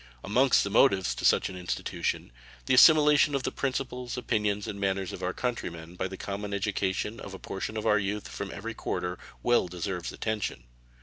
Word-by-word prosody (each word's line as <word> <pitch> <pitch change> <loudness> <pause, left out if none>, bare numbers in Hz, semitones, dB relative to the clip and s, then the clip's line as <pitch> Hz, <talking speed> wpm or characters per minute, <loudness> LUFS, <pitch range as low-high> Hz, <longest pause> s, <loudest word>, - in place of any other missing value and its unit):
Amongst 125 +6 +4
the 100 - -3
motives 100 -5 +4
to - - -4
such - - +4
an 95 - -8
institution, 90 -8 -3 0.3
the 130 - +2
assimilation 150 +1 +7
of 135 - -1
the - - -1
principles, 125 -2 -3
opinions, 105 -4 0
and 100 - -5
manners 95 -1 -1
of - - -7
our 90 0 -1
country 125 +2 -2
men 85 0 -10
by 90 +1 -2
the 95 0 -8
common 100 +1 -4
education 100 +2 -1
of 95 - -8
a - - -7
portion 95 +4 -5
of 110 - -3
our 105 - +4
youth 100 -1 -3
from - - -6
every - - -6
quarter 90 0 -3 0.2
well 120 -6 +3
deserves 90 0 -4
attention. 105 - -3
100 Hz, 190 wpm, -28 LUFS, 95-120 Hz, 0.3 s, assimilation